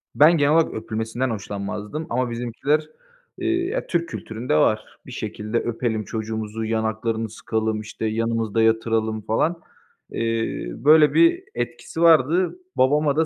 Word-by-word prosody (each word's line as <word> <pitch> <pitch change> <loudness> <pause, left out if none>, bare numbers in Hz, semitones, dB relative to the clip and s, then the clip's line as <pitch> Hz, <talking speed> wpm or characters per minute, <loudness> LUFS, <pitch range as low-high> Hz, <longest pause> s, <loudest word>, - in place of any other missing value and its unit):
Ben 160 +3 +6
genel 145 -1 +3
olarak 165 0 +3
öpülmesinden 110 +3 -3
hoşlanmazdım 105 +6 -5
ama 125 +1 0
bizimkiler, 125 +6 -1 0.5
eee 350 -1 0
ya, - - -3
Türk 170 -1 -1
kültüründe 115 - -3
var. 75 - +1
Bir - - -10
şekilde 105 +2 -4
öpelim 115 -2 -2
çocuğumuzu, 110 0 -4
yanaklarını 110 0 -1
sıkalım, 110 0 -2
işte, 110 +1 -6
yanımızda 115 0 0
yatıralım 110 -1 +1
falan. 160 +11 0 0.5
Eee, 115 - -2
böyle 150 +4 +5
bir 335 +2 +4
etkisi 165 - -4
vardı. 170 - +4 0.2
Babama 145 +2 +3
da 160 +1 +3
115 Hz, 130 wpm, -23 LUFS, 110-155 Hz, 0.5 s, Ben